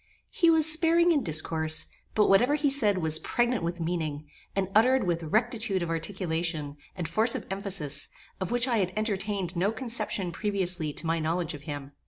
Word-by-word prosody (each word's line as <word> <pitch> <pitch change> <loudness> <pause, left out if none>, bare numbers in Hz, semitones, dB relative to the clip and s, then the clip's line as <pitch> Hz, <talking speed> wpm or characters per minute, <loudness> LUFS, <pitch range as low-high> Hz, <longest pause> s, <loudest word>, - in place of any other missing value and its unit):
He 335 - +3
was 320 -2 +4
sparing 330 +2 +3
in 300 -4 +2
discourse; 155 -2 +3 0.3
but 210 - +4
whatever 245 +9 +4
he 290 -2 +1
said 215 -8 +3
was 160 -2 +2
pregnant 240 +4 0
with 170 +1 -3
meaning, 160 -3 -3 0.3
and 195 -1 0
uttered 250 +3 +4
with 170 -2 -1
rectitude 215 - 0
of 165 - -4
articulation, 165 -4 -3 0.2
and 175 -4 -4
force 220 +8 +3
of - - -5
emphasis, 195 -7 0 0.3
of 185 - -3
which 245 +1 +2
I 240 -3 +1
had 185 -2 -1
entertained 200 -4 -2
no 185 +5 +1
conception 220 -6 -1
previously 180 -5 -1
to 155 - -5
my 165 +1 0
knowledge 165 +1 -2
of 145 - -9
him. 145 -1 -6
190 Hz, 180 wpm, -27 LUFS, 165-230 Hz, 0.3 s, was